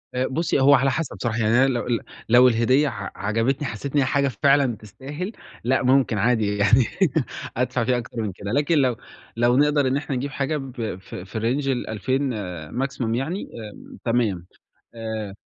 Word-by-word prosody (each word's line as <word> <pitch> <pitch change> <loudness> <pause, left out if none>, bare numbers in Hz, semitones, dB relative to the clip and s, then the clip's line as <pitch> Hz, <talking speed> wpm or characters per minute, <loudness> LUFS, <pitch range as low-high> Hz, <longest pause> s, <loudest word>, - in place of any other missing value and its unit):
آآ 130 +1 +1
بُصّي، 155 +1 0
هو 140 +2 +6
على 135 0 +4
حسب 160 +1 -3
صراحة. 115 -2 -1
يعني 110 -1 +2
أنا 135 +1 +5
لو 120 -3 -1
ل 120 -2 +1 0.3
لو 125 +2 +7
الهدية 130 +5 +3
ع 105 -6 -5
عجبتني، 115 +8 0
حسّيت 125 +6 -5
إن - - +5
هي 130 - +3
حاجة 140 +1 +1
فعلًا 135 +1 +2
تستاهل، 145 - -7 0.3
لأ 130 +2 +1
ممكن 130 -3 +3
عادي 110 -2 +1
يعني 110 +4 +4 0.7
أدفع 125 0 0
فيها 125 +1 +1
أكتر 120 0 -5
من 105 -3 -2
كده، 100 +3 -6
لكن 145 +4 +2
لو 130 -4 +3 0.4
لو 120 +2 +3
نقدر 145 -1 +3
إن 130 - +1
إحنا 145 -2 -3
نجيب 135 +2 -3
حاجة 140 +3 -1
ب 125 -7 -5
ف 95 - -11
في 95 +5 -6
Range 130 +6 0
ال2000 130 +2 -1
آآ 90 -7 -6
Maximum 125 -3 -2
يعني 160 +10 -3 0.3
آمم - - -13
تمام. 110 -7 0 0.5
آآ 110 -3 -5
125 Hz, 185 wpm, -23 LUFS, 110-135 Hz, 0.7 s, لو